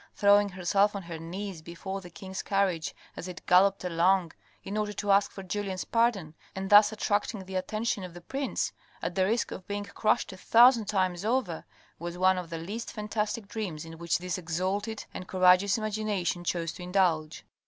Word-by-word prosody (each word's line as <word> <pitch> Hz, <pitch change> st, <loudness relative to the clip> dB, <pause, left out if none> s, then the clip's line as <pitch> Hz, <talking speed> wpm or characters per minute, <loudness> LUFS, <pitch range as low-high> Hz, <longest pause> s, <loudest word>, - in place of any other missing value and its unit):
Throwing 205 Hz, 0 st, +5 dB
herself 195 Hz, +3 st, +1 dB
on 200 Hz, -, -4 dB
her 170 Hz, -1 st, -7 dB
knees 180 Hz, +1 st, -6 dB
before 190 Hz, +4 st, -6 dB
the 180 Hz, -, -11 dB
king's 190 Hz, +2 st, -7 dB
carriage 195 Hz, -5 st, 0 dB, 0.2 s
as 175 Hz, -, -6 dB
it 180 Hz, -1 st, -9 dB
galloped 195 Hz, +2 st, +4 dB
along, 180 Hz, 0 st, +2 dB, 0.3 s
in 195 Hz, -, -5 dB
order 210 Hz, -1 st, -1 dB
to 205 Hz, 0 st, -1 dB
ask 200 Hz, +1 st, +4 dB
for 195 Hz, -, -8 dB
Julien's 190 Hz, 0 st, -3 dB
pardon, 230 Hz, -9 st, +1 dB, 0.2 s
and 190 Hz, +1 st, -4 dB
thus 205 Hz, +1 st, +8 dB
attracting 205 Hz, -1 st, -1 dB
the 190 Hz, -, -9 dB
attention 210 Hz, +2 st, -1 dB
of 180 Hz, -2 st, -8 dB
the 175 Hz, -, -9 dB
prince, 270 Hz, +9 st, -2 dB, 0.3 s
at -, -, -2 dB
the 185 Hz, 0 st, +2 dB
risk 230 Hz, +3 st, 0 dB
of 185 Hz, -, -8 dB
being 205 Hz, 0 st, -3 dB
crushed 215 Hz, -1 st, 0 dB
a -, -, -10 dB
thousand 235 Hz, +3 st, +6 dB
times 185 Hz, -3 st, 0 dB
over, 220 Hz, -8 st, -1 dB, 0.3 s
was 175 Hz, +1 st, -5 dB
one 185 Hz, 0 st, +4 dB
of 175 Hz, -2 st, -7 dB
the 165 Hz, -, -4 dB
least 205 Hz, +8 st, -5 dB
fantastic 210 Hz, 0 st, -3 dB
dreams 195 Hz, -8 st, -5 dB
in 165 Hz, 0 st, -10 dB
which 170 Hz, 0 st, +1 dB
this 180 Hz, +1 st, -3 dB
exalted 190 Hz, +6 st, -2 dB
and 185 Hz, -, -7 dB
courageous 185 Hz, +2 st, +4 dB
imagination 210 Hz, -5 st, -2 dB
chose 165 Hz, -1 st, -1 dB
to -, -, -11 dB
indulge. 180 Hz, -4 st, 0 dB
190 Hz, 185 wpm, -29 LUFS, 175-205 Hz, 0.3 s, thus